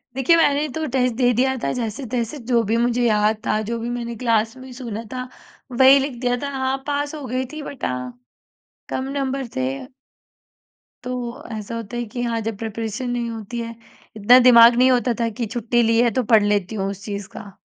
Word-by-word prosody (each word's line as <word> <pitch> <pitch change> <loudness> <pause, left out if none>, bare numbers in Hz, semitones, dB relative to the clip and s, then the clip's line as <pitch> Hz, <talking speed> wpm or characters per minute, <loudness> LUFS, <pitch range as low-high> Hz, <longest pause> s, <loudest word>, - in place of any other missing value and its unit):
देखिए, 265 +5 +4
मैंने 295 -1 +3
तो 320 0 -2
टेस्ट 250 -1 +1
दे 245 -1 +3
दिया 265 +3 +1
था - - 0
जैसे-तैसे 240 +2 -3
जो 235 - +4
भी 225 +2 0
मुझे 240 +1 +1
याद 215 0 +2
था, 215 - +1
जो 230 +2 -3
भी 235 +1 -4
मैंने 235 -1 -4
क्लास 225 -1 +1
में 260 0 -11
सुना 230 -3 -6
था 255 0 -4 0.5
वही 265 +1 +8
लिख 270 -3 -4
दिया 245 -1 +1
था। 285 - -2
हाँ, 265 0 0
पास 290 +1 -2
हो 290 - -7
गई 255 +2 -2
थी 310 - -6
बट 280 -2 -6
हाँ, 125 -1 -4 0.7
कम 260 - -2
नंबर 270 -1 -2
थे 130 0 0 0.2
अ - - -11 1.2
तो 250 -1 -5
ऐसा 215 +1 -5
होता 230 +1 -6
है 240 - -1
कि 235 +3 -6
हाँ, 230 -1 -1
जब 220 -1 -4
प्रिपरेशन 225 +3 -4
नहीं 240 -1 -2
होती 225 +1 -6
है, 230 0 -5 0.4
इतना 240 +5 +7
दिमाग 235 -1 +8
नहीं 255 +2 +5
होता 245 -1 +2
था 230 -1 +1
कि 235 +1 -4
छुट्टी 240 +2 0
ली 230 0 +3
है 240 - +3
तो 255 - +1
पढ़ 215 -2 +7
लेती 205 0 0
हूँ 195 -1 -1
उस 200 0 -7
चीज़ 200 -2 -5
का। 200 - -9
240 Hz, 210 wpm, -21 LUFS, 220-255 Hz, 1.2 s, वही